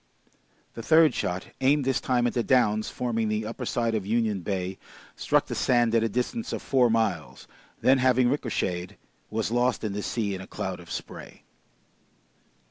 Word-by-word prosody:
The 115 - -7
third 160 +5 +5
shot, 90 +1 -3
aimed 140 +1 +3
this 135 -1 +1
time 125 -2 +1
at 120 - 0
the 120 - +1
downs 110 -4 +2
forming 115 -3 -2
the 105 0 -1
upper 115 - -5
side 115 -1 0
of 110 -3 -1
Union 110 -1 0
Bay, 95 0 -3 0.4
struck - - +1
the - - -6
sand 120 -2 +2
at 115 - +4
a 115 - +1
distance 125 - -2
of - - -4
four 125 -3 +3
miles, 110 -3 -1 0.3
then 130 +1 +4
having 130 -1 +3
ricocheted: 95 -9 -2 0.3
was 110 0 -2
lost 120 0 +1
in 105 -2 -2
the 105 - -3
sea 105 -2 -2
in 95 - -5
a 95 - -10
cloud - - -5
of - - -13
spray. - - -8
115 Hz, 180 wpm, -26 LUFS, 105-125 Hz, 0.4 s, third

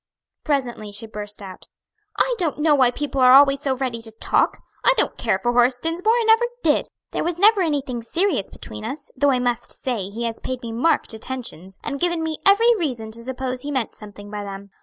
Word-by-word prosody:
Presently 245 -8 -2
she 205 +2 -3
burst 210 -1 -7
out, 185 -2 -11 0.5
"I - - +2
don't 330 -5 0
know 300 0 +3
why 260 -4 +5
people 275 +1 -3
are 255 0 +7
always 275 0 +6
so 275 -3 0
ready 250 -3 -3
to 225 -1 -7
talk! 220 - +1 0.3
I - - +5
don't - - +1
care - - 0
for 240 - 0
Horace 245 +1 +4
Dinsmore, 350 - +1
and 470 - +1
never 450 +2 +5 0.2
did! 300 -2 +2 0.2
There - - -2
was 345 0 -1
never 410 +2 +5
anything 280 -7 -1
serious 305 - 0
between 105 0 -10
us, 285 0 -6
though 285 +1 +3
I 260 - +3
must 245 -1 -1
say 225 -7 -2
he 225 +4 -5
has 230 -1 -3
paid 255 -1 -5
me 230 - -5
marked 240 +3 +1
attentions, 220 -6 -5
and 280 -1 -4
given 345 0 0
me 320 -1 -2
every 455 +4 +6
reason 240 -9 -3
to 230 - -4
suppose 255 +1 -3
he 290 - -4
meant 260 -5 -2
something 205 -1 -11
by 210 -1 -4
them. 200 0 -8
255 Hz, 215 wpm, -22 LUFS, 225-310 Hz, 0.5 s, are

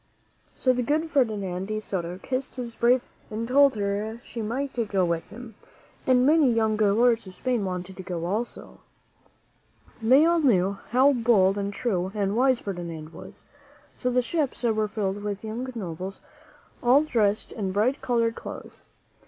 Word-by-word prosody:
So 255 - +2
the 250 - -1
good 310 +6 0
Ferdinand 200 -8 0
de 215 0 -2
Soto 180 -4 -4
kissed 255 +6 -4
his 240 -2 -5
brave 245 +2 +3
wife - - -32
and 225 +2 -3
told 275 +1 +5
her 210 +2 -2
she 230 - -6
might 260 +6 -3 0.2
go 190 -3 +2
with 170 -1 -1
him; 235 +1 -10 0.5
and 255 -1 +4
many 300 -3 +5
young 220 -1 +2
lords 220 +2 +3
of 185 - -11
Spain 250 -4 -1
wanted 185 0 -5
to - - -6
go 175 -2 -4
also. 215 +7 -4 1.2
They 260 +7 +6
all 340 0 +3
knew 200 - +2
how 265 +4 +5
bold 220 -6 +3
and 200 0 -2
true 190 -4 -1
and 200 -1 0
wise 255 0 +3
Fer 200 - -4
dinand 165 -3 -7
was; - - -12 0.5
so 250 - -1
the 250 0 +2
ships 290 -2 -2
were 215 -2 +1
filled 205 -2 -3
with 205 0 -4
young 235 +4 -4
nobles, 185 -2 -6 0.6
all 255 +5 +5
dressed 215 -8 0
in 195 -4 -3
bright 225 +8 +1
colored 230 -2 +1
clothes. - - -9
220 Hz, 170 wpm, -26 LUFS, 195-250 Hz, 1.2 s, They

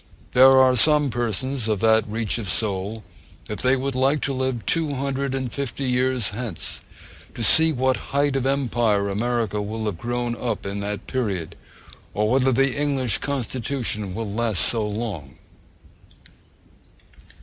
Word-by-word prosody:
There 130 +1 +7
are 130 -1 +5
some 150 +2 +4
persons 120 +2 -2
of 105 -3 0
that 110 -1 +3
reach 110 0 -2
of 105 -5 -5
soul 105 +2 -1 0.4
that 105 - -4
they 130 +1 +3
would 135 +1 -2
like 135 +4 +2
to 140 - -1
live 130 -3 -2
two 155 -4 0
hundred 135 0 -2
and 130 -3 -3
fifty 140 -1 -4
years 125 -3 +1
hence, 110 -5 -5 0.5
to 115 - -4
see 160 +8 +6
to 155 - -2
what 130 +1 +1
height 140 0 +1
of 135 -1 0
empire 120 -7 +1
America 110 0 -1
will 110 +2 -4
have 100 -6 -3
grown 120 +1 -2
up 115 -5 -4
in 100 +1 -4
that 100 0 -4
period, 95 -10 -3 0.6
or 105 +2 +1
whether 130 0 +3
the 135 +1 +2
English 135 -6 0
constitution 120 -7 -3
will 115 -1 -3
last 105 -5 0
so 110 -3 0
long. 105 - -5
120 Hz, 155 wpm, -23 LUFS, 105-135 Hz, 0.6 s, There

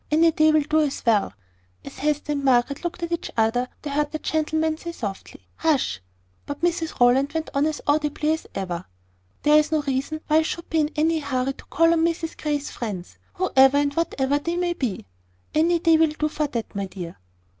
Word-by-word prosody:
Any 325 +2 +4
day 310 0 +4
will 310 0 +4
do 305 +2 +1
as 290 -4 -1
well." 215 -4 +3 0.5
As - - -10
Hester 295 +1 0
and 285 -1 -2
Margaret 265 +2 +2
looked 345 0 -4
at 340 - -3
each 340 - -2
other, 230 +3 +2 0.2
they 295 - -4
heard 295 +1 0
the 310 - -2
gentleman 315 0 0
softly 225 - -6
say - - -36
"Hush!" 275 - +1 0.5
But 285 0 -5
Mrs 335 -2 -1
Rowland 255 +4 +4
went 320 -1 -3
on 280 +2 +2
as 310 -1 -3
audibly 300 +1 +1
as 320 - -5
ever. 180 -2 -4 0.6
"There 300 +1 +6
is 305 +1 -1
no 310 -2 +1
reason 280 +3 -2
why 310 - +3
I - - +5
should 335 +1 -4
be 325 - +2
in 300 -1 +2
any 320 +1 +2
hurry 270 -2 -1
to - - -15
call 330 0 +3
on 325 -1 +2
Mrs 330 -1 -1
Grey's 295 -1 -2
friends, 200 -7 -6 0.2
whoever 270 -7 +4
and 285 0 +1
whatever 285 -3 0
they 335 +4 -3
may 350 -1 0
be. 235 - -3 0.5
Any 335 +3 +3
day 330 -1 +4
will 320 0 +5
do 305 0 -2
for 300 0 -1
that, 235 -5 -5
my 200 -1 -3
dear." 175 -3 -8
300 Hz, 210 wpm, -24 LUFS, 265-320 Hz, 0.6 s, There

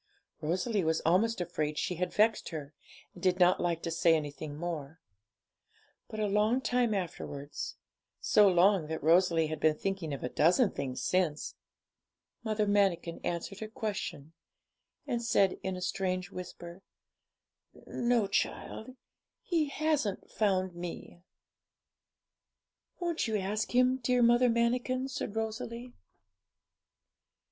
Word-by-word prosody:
Rosalie 185 +6 0
was 160 0 +1
almost 200 +7 +2
afraid 155 -4 -2
she 180 - -1
had 180 +1 -2
vexed 220 +2 +2
her, 150 -3 -7 0.4
and 175 - -13
did 185 0 +2
not 180 0 +5
like 170 -2 -1
to 165 - -2
say 165 0 +4
anything 145 -1 -4
more. 160 -2 -5 1.1
But 215 - -7
a 215 - +1
long 210 +4 +2
time 245 -3 +1
afterwards 150 -6 -5 0.4
so 210 -1 +5
long 185 -2 +4
that 160 +1 -4
Rosalie 165 0 +4
had 155 0 -4
been 155 -1 +3
thinking 195 -5 -3
of 140 - -5
a 125 - -2
dozen 185 - +3
things 130 -2 -4
since 175 -5 0 0.9
Mother 215 -2 0
Manikin 195 -5 +1
answered 175 +3 -3
her 220 - -5
question, 205 -9 -5 0.7
and 235 - -1
said 200 -5 +2
in 190 -1 -3
a 180 - -7
strange 185 0 -2
whisper 175 0 -8 1.0
'No, 240 -3 +1
child; 220 +4 -3 0.5
He 330 -4 +1
hasn't 290 -9 -1
found 190 -3 +1
me.' 175 0 -8 1.8
'Won't 340 -6 -1
you 220 -1 0
ask 210 +4 -2
Him, 255 +1 +4
dear 250 -1 +2
Mother 240 +1 +5
Manikin?' 250 +3 0
said 220 -5 -4
Rosalie. 230 +2 -4
190 Hz, 130 wpm, -31 LUFS, 170-225 Hz, 1.8 s, not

